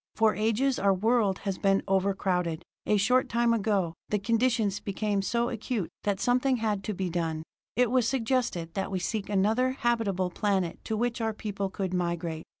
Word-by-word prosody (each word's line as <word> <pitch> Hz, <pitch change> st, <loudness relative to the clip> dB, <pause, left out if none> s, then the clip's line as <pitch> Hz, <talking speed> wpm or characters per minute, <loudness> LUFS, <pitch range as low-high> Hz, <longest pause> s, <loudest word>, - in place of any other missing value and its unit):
For 220 Hz, -1 st, +4 dB
ages 230 Hz, +5 st, +1 dB
our 195 Hz, -1 st, +3 dB
world 210 Hz, -1 st, +2 dB
has 195 Hz, -2 st, -2 dB
been 195 Hz, 0 st, +2 dB
overcrowded. 185 Hz, -3 st, 0 dB, 0.2 s
A 210 Hz, -, +4 dB
short 250 Hz, +6 st, +3 dB
time 235 Hz, 0 st, +2 dB
ago, 200 Hz, -6 st, +1 dB, 0.2 s
the 210 Hz, -, +2 dB
conditions 225 Hz, -1 st, +1 dB
became 200 Hz, 0 st, -1 dB
so 235 Hz, +4 st, 0 dB
acute 220 Hz, -6 st, -3 dB
that 200 Hz, -2 st, +1 dB
something 255 Hz, +2 st, +2 dB
had 210 Hz, -3 st, -1 dB
to 210 Hz, -, -2 dB
be 185 Hz, 0 st, -2 dB
done. 165 Hz, -2 st, -2 dB, 0.3 s
It 245 Hz, -1 st, +3 dB
was 250 Hz, -3 st, +3 dB
suggested 230 Hz, -10 st, -1 dB
that 195 Hz, -, -2 dB
we 190 Hz, -, -1 dB
seek 205 Hz, +3 st, -3 dB
another 220 Hz, +6 st, +2 dB
habitable 215 Hz, -8 st, 0 dB
planet 190 Hz, -4 st, -1 dB
to 220 Hz, -, -1 dB
which 240 Hz, +1 st, -1 dB
our 220 Hz, -1 st, 0 dB
people 200 Hz, -2 st, -3 dB
could 190 Hz, -1 st, -3 dB
migrate. 170 Hz, -2 st, -2 dB
205 Hz, 175 wpm, -28 LUFS, 190-230 Hz, 0.3 s, For